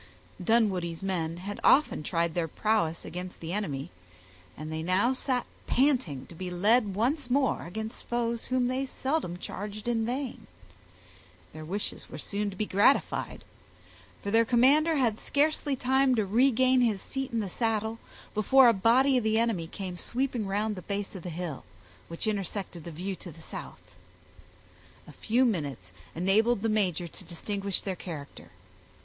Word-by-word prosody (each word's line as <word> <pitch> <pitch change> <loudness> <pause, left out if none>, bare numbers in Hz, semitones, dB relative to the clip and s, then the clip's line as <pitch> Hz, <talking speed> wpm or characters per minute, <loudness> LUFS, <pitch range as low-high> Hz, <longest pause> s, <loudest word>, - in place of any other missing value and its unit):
Dunwoodie's 185 -6 +1
men 170 -4 -1
had 200 +3 -6
often 295 - +4
tried 165 +1 0
their 170 -1 0
prowess 170 -3 0
against 180 +2 -7
the 165 +1 -5
enemy, 145 -10 -3 0.7
and 155 +1 -6
they 160 0 -3
now 185 +9 +2
sat 255 -1 -1 0.2
panting 250 - +1
to - - -13
be 180 +2 -5
led 205 +3 +3
once 255 +5 0
more 265 -7 +1
against 220 +5 -6
foes 235 -1 -1
whom 255 -1 +1
they 260 +2 -1
seldom 260 - -2
charged 205 +4 -6
in 230 -2 +1
vain. 250 +2 -3 1.1
Their 155 - -8
wishes 195 +6 -4
were - - -7
soon 205 0 -2
to 195 - -9
be 215 - -1
gratified; 205 +8 +2 0.8
for 200 - -2
their 225 +1 +5
commander 275 +8 +4
had 235 -6 +1
scarcely 290 -1 +1
time 265 +1 +3
to 215 -3 +1
regain 255 +4 +4
his 220 -5 +2
seat 270 +5 -4
in 230 - 0
the 210 - -2
saddle, 220 +2 -1 0.3
before 255 +5 +6
a - - +5
body 250 +6 +4
of 245 - +1
the 220 0 +2
enemy 225 -8 +1
came 185 0 -6
sweeping 245 -1 -1
round 210 +2 0
the 185 - -7
base 200 +1 -4
of 190 - -7
the 180 - -6
hill, 165 -4 -5 0.4
which 165 +5 -5
intersected 195 -5 -3
the 170 - -6
view 185 +5 -4
to 175 - -10
the 165 - -15
south. - - -9 1.1
A - - -10
few 240 +4 +1
minutes 140 - -2 0.2
enabled 200 +6 +2
the 225 - +2
major 185 -5 +1
to 175 - -12
distinguish 195 +3 -3
their 190 -2 -3
character. 155 -6 -8
210 Hz, 165 wpm, -29 LUFS, 180-245 Hz, 1.1 s, before